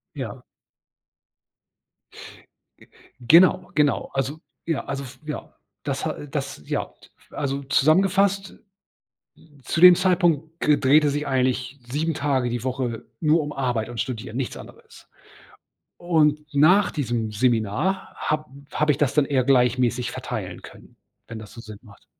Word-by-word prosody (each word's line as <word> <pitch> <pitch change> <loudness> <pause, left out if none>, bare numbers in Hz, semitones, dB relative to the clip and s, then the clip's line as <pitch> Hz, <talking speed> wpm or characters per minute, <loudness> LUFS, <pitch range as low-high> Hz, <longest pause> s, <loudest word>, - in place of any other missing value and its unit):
Ja. - - -6 2.8
Genau. 180 +8 +5
Genau. 150 -2 +1
Also. 135 +3 -2 0.3
Ja. 165 -3 -1
Also 140 0 -4
f 130 0 -12
ja, 150 - -7 0.3
das - - -3
ha - - 0
äh, 145 - -10
das 135 - -5
ja. - - -3 0.4
Also 140 -1 -3
zusammengefasst, 195 +8 +2 1.1
zu 165 - -2
dem 180 -1 +10
Zeitpunkt 170 -4 +1
g 150 -1 +3
drehte 145 +2 +4
sich 145 +1 -2
eigentlich 130 0 -1
7 155 +5 -1
Tage 140 -5 0
die 120 -1 -4
Woche 125 -3 -3 0.2
nur 155 +1 +3
um 150 0 -5
Arbeit 120 -4 -2
und 120 -1 -7
Studieren, 115 -1 -4
nichts 135 - -3
anderes. - - -15 0.9
Und, 155 -3 +1
nach 175 +8 +4
diesem 120 -6 -2
Seminar 115 - 0
hab 155 0 -2 0.3
habe 150 0 +1
ich 140 - -5
das 140 -2 +1
dann 150 -1 +4
eher 135 -3 0
gleichmäßig 125 -2 +2
verteilen - - -6
können, - - -15 0.3
wenn 115 - -7
das 105 -2 -11
so 115 - -11
Sinn 110 -2 -11
macht. 105 -4 -18
140 Hz, 140 wpm, -23 LUFS, 125-155 Hz, 2.8 s, dem